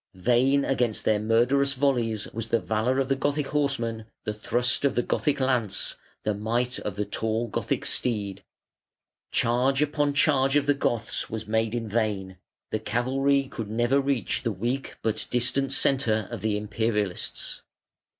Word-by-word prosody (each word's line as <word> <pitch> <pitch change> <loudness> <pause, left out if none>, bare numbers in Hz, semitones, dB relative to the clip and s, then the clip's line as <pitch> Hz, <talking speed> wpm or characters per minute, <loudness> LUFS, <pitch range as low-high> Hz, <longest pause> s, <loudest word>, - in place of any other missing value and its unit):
Vain 125 +8 +2
against 125 -5 0
their 105 -1 +3
murderous 125 +6 +2
volleys 120 -6 0
was 115 0 -4
the 115 - +2
valour 110 +4 0
of 135 - +1
the 135 - +1
Gothic 145 +2 -1
horseman, 115 -7 -1 0.2
the 105 - -2
thrust 120 +5 +1
of 140 - +2
the 120 - +2
Gothic 145 +3 0
lance, 125 -6 0 0.3
the 105 - 0
might 120 +4 -1
of 105 - -5
the 105 0 -2
tall 110 +2 -1
Gothic 105 - -2
steed. 100 -5 0 0.9
Charge 125 +3 +2
upon 145 -1 +1
charge 135 -2 +3
of 145 -1 +3
the 145 - +4
Goths 120 -5 -1
was 110 0 -5
made 110 +1 0
in 115 -2 -3
vain; 100 -4 -2 0.3
the 110 - 0
cavalry 135 +5 +1
could 115 -5 -6
never 120 +5 +2
reach 135 -4 -1
the 120 -3 -1
weak 120 +7 -3
but 110 -1 -1
distant 130 +3 +2
centre 115 -7 +3
of - - -5
the 105 -1 0
Imperialists. 105 -2 -2
120 Hz, 160 wpm, -26 LUFS, 110-135 Hz, 0.9 s, the